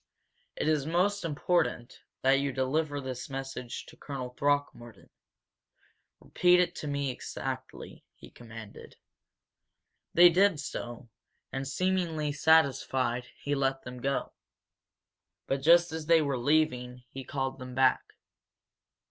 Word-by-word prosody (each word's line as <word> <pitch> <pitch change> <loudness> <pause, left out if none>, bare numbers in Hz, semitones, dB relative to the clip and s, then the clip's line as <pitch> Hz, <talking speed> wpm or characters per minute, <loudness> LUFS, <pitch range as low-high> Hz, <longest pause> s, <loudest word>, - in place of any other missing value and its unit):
It - - -2
is 155 -2 +1
most 185 +5 +1
important 150 -5 -1 0.2
that 135 +1 +4
you 140 0 -1
deliver 145 +3 -1
this 130 -1 -6
message 135 -2 -6
to - - -15
Colonel 130 -3 -6
Throckmorton. 140 -3 -2 1.1
Repeat 180 0 +3
it 175 -1 +2
to 150 - -5
me 140 -2 -1
exactly," - - -7
he - - -15
commanded. 115 -3 -11 1.2
They 175 +1 +9
did 185 -1 +3
so, 120 -4 -6 0.4
and, 135 0 -4
seemingly 165 -1 0
satisfied, 135 -5 +2 0.2
he 145 - -1
let 135 -1 0
them 125 0 -9
go. 140 +1 -1 1.1
But 135 0 -1
just 170 +3 +5
as 160 -1 -5
they 165 -2 +5
were 140 -2 -1
leaving, 125 -2 0
he 135 - -7
called 135 +1 -3
them 130 -1 -8
back. 130 -1 +4
140 Hz, 125 wpm, -29 LUFS, 130-160 Hz, 1.2 s, They